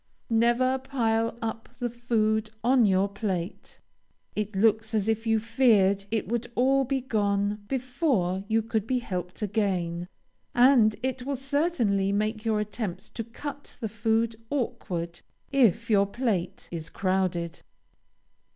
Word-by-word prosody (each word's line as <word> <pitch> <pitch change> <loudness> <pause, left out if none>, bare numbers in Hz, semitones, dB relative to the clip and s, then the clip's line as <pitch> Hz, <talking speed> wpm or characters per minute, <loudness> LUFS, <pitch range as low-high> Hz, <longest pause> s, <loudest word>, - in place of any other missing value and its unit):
Never 240 +3 +3
pile 230 -4 0
up 225 0 -4
the 245 - -1
food 220 -2 0
on 250 0 +5
your 195 0 +3
plate. 195 -3 -4 0.6
It 210 -1 -3
looks 220 +2 +2
as 210 -1 +1
if 225 +1 0
you 225 0 +3
feared 215 -4 +3
it 220 0 -1
would 240 +1 -2
all 270 +2 +3
be 265 +1 -1
gone 205 -3 0
before 245 - 0
you 220 0 +2
could 220 -1 -2
be 255 - +1
helped 180 -4 -4
again, 180 -5 -1 0.5
and 245 -4 +6
it 260 -1 -1
will 280 +2 -2
certainly 270 - +1
make 215 +2 -1
your 220 -2 +1
attempts 210 -3 -4
to 230 - -5
cut 285 +5 -8
the 220 - -3
food 225 +1 0
awkward, 175 -10 -3 0.3
if 230 -4 +3
your 200 -2 +4
plate 200 -5 -2
is 165 -2 -5
crowded. 185 -3 -1
220 Hz, 135 wpm, -27 LUFS, 200-245 Hz, 0.6 s, and